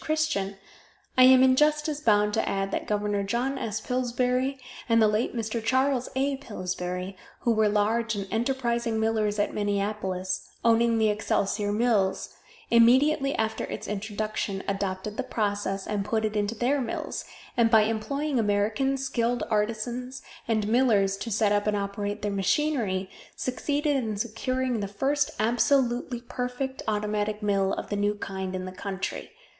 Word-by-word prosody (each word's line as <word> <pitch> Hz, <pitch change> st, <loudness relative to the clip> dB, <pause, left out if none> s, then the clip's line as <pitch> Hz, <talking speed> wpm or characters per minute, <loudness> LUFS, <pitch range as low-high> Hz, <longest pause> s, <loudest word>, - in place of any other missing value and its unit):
Christian, 310 Hz, -12 st, -1 dB, 0.6 s
I 255 Hz, -, +8 dB
am 260 Hz, 0 st, +7 dB
in 260 Hz, 0 st, +5 dB
justice 300 Hz, +1 st, +2 dB
bound 210 Hz, -4 st, +3 dB
to -, -, 0 dB
add 195 Hz, 0 st, -1 dB
that -, -, -3 dB
Gov. 205 Hz, -1 st, 0 dB
John 255 Hz, +5 st, -1 dB
S. 220 Hz, -1 st, -2 dB
Pillsbury 250 Hz, +2 st, 0 dB, 0.3 s
and 230 Hz, 0 st, +5 dB
the 220 Hz, -, +6 dB
late 210 Hz, +3 st, 0 dB
Mr. 225 Hz, 0 st, -2 dB
Charles 260 Hz, +2 st, +1 dB
A. 275 Hz, +1 st, +1 dB
Pillsbury, 185 Hz, -5 st, -4 dB, 0.3 s
who 235 Hz, -, +2 dB
were 215 Hz, -1 st, +3 dB
large 220 Hz, +2 st, +1 dB
and 200 Hz, -1 st, -4 dB
enterprising 235 Hz, -1 st, 0 dB
millers 220 Hz, -1 st, +1 dB
at 205 Hz, -, 0 dB
Minneapolis, 200 Hz, -2 st, -2 dB, 0.2 s
owning 230 Hz, 0 st, +4 dB
the 220 Hz, -1 st, +3 dB
Excelsior 205 Hz, 0 st, 0 dB
Mills, 210 Hz, -4 st, +1 dB, 0.4 s
immediately 270 Hz, +5 st, +5 dB
after 220 Hz, 0 st, -1 dB
its -, -, -6 dB
introduction 210 Hz, -1 st, -3 dB
adopted 195 Hz, +1 st, -3 dB
the -, -, +1 dB
process, 205 Hz, -3 st, -2 dB
and 205 Hz, -2 st, -1 dB
put 220 Hz, +2 st, 0 dB
it 215 Hz, 0 st, -2 dB
into 210 Hz, +2 st, 0 dB
their 260 Hz, +5 st, +1 dB
mills, 235 Hz, -, -4 dB, 0.3 s
and 235 Hz, -2 st, +4 dB
by 220 Hz, -2 st, +6 dB
employing 255 Hz, +6 st, -1 dB
American 215 Hz, +6 st, +1 dB
skilled 245 Hz, -2 st, -1 dB
artizans 235 Hz, +4 st, -2 dB, 0.2 s
and 215 Hz, -2 st, +1 dB
millers 215 Hz, -5 st, +3 dB
to 215 Hz, +4 st, -5 dB
set 215 Hz, -1 st, +2 dB
up 205 Hz, 0 st, +1 dB
and 210 Hz, -1 st, +1 dB
operate 205 Hz, +1 st, -3 dB
their 205 Hz, -, 0 dB
machinery, 200 Hz, -1 st, 0 dB, 0.3 s
succeeded 290 Hz, +3 st, -1 dB
in 225 Hz, -6 st, -1 dB
securing 245 Hz, +3 st, -1 dB
the 200 Hz, -, -2 dB
first 280 Hz, +8 st, 0 dB
absolutely 240 Hz, +1 st, +1 dB
perfect 250 Hz, +2 st, -4 dB
automatic 210 Hz, 0 st, -1 dB
mill 195 Hz, -2 st, +2 dB
of -, -, -4 dB
the 205 Hz, -, -1 dB
new 205 Hz, +1 st, +1 dB
kind 190 Hz, -2 st, -5 dB
in 185 Hz, 0 st, -4 dB
the 185 Hz, -, -6 dB
country. 190 Hz, +1 st, -5 dB
220 Hz, 155 wpm, -27 LUFS, 205-250 Hz, 0.6 s, I